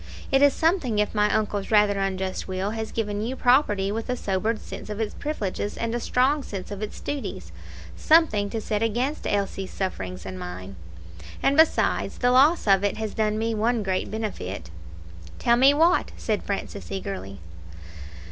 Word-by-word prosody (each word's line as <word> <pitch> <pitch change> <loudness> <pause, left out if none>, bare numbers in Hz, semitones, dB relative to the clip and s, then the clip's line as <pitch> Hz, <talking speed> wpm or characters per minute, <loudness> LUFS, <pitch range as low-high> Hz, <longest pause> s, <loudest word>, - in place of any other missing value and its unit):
It 270 - +4
is 285 0 +7
something 320 - +1
if 210 0 +1
my 210 -1 +2
uncle's 205 -2 -1
rather 210 -2 +4
unjust 190 -1 -2
will 190 +2 -2
has 220 0 -4
given 210 -2 -2
you 240 +4 -2
property 245 -7 +3
with 225 +3 -4
a 250 - +1
sobered 215 +1 -1
sense - - -9
of 210 0 -5
its 220 -2 -2
privileges 205 -8 -3
and 230 0 -2
a 240 - -1
strong 265 +5 +2
sense 195 -8 -7
of 205 0 -6
its 215 - -5
duties 285 -2 -5 0.4
something 310 -11 +3
to 225 - -3
set 215 -1 -2
against 240 +7 -1
Elsie's 195 -1 -1
sufferings 95 - -4
and 95 -1 -6
mine. 90 +2 -7 0.7
And, 275 - +3
besides, 320 +1 +3
the 245 0 +2
loss 285 +7 +5
of 195 -2 +4
it 205 +1 0
has 220 -1 -4
done 215 -1 0
me 225 +1 -1
one 225 +1 +1
great 190 -1 -1
benefit." 100 - -5 0.7
"Tell 235 -1 +3
me 265 +3 +6
what," 330 +5 +3
said 215 -2 -1
Francis, 200 0 -5
eagerly. 190 - -5
210 Hz, 175 wpm, -25 LUFS, 195-245 Hz, 0.7 s, is